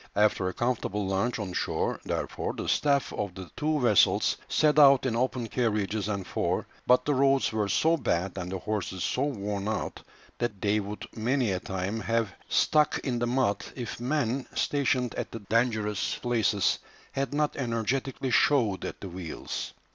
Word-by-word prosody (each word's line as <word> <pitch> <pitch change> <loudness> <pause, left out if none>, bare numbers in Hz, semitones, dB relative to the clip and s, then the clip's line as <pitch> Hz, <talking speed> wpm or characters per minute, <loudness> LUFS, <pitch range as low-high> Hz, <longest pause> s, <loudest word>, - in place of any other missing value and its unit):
After 105 -2 +3
a - - -6
comfortable 110 -4 -1
lunch 100 +5 0
on 100 -5 -4
shore, - - -1
therefore, - - -3
the - - -5
staff 140 -3 +2
of 100 -3 -3
the 95 -2 -9
two 150 0 0
vessels 120 -6 +4
set 150 0 +3
out 140 -2 +7
in 120 -3 0
open 125 0 0
carriages 105 -4 0
and 100 -3 -2
four; - - -1 0.2
but 125 - +5
the 145 - +2
roads 135 0 +3
were 105 -2 0
so 160 +11 +3
bad 90 - -1
and 90 -1 -5
the 95 - -2
horses 95 -2 -3
so 125 - 0
worn 105 -7 -2
out 110 - -3 0.4
that 115 -5 -2
they 105 +1 +2
would 105 +1 -6
many 120 0 +1
a 90 - -1
time 95 +4 -3
have 115 -3 0 0.2
stuck 150 -1 +3
in 125 -3 -1
the 120 - 0
mud 120 -4 +1
if 120 -4 -5
men 130 0 -1
stationed 130 -4 +1
at - - -4
the 115 - -7
dangerous 105 -2 0
places 110 -5 +1 0.3
had 135 -2 -2
not 150 +1 0
energetically 130 +2 -1
shoved 115 -7 +3
at - - -6
the 100 - -5
wheels. 90 -2 -5
115 Hz, 170 wpm, -28 LUFS, 100-130 Hz, 0.4 s, out